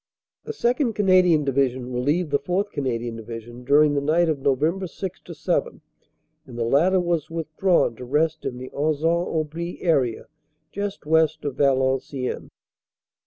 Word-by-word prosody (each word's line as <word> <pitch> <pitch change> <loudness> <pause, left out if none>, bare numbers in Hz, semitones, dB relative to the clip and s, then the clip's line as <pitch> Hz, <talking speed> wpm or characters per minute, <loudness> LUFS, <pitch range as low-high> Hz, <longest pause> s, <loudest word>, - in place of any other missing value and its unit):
;( - - -70
The - - -4
2nd. 245 - 0
Canadian 185 -6 +4
Division 130 -2 0
relieved 145 +6 0
the 140 - +2
4th. 190 +7 -1
Canadian 120 -4 -3
Division 115 +2 -9
during 145 +3 +4
the 140 - 0
night 160 +4 +2
of 155 -3 -1
Nov. 155 +7 0
6 190 +1 -6
7, - - -2 0.7
and 120 - -10
the 120 - 0
latter 165 +11 +3
was 170 -3 -1
withdrawn 165 -3 +1
to 125 - -8
rest 155 +4 0
in 125 - -4
the 130 +1 -8
Anzin 155 +4 0
Aubry 160 +2 -3
area, 135 -9 +1 0.5
just 200 -3 -5
west 160 -1 +2
of 140 -3 -3
Valenciennes. 130 -1 0
150 Hz, 150 wpm, -23 LUFS, 130-170 Hz, 0.7 s, Canadian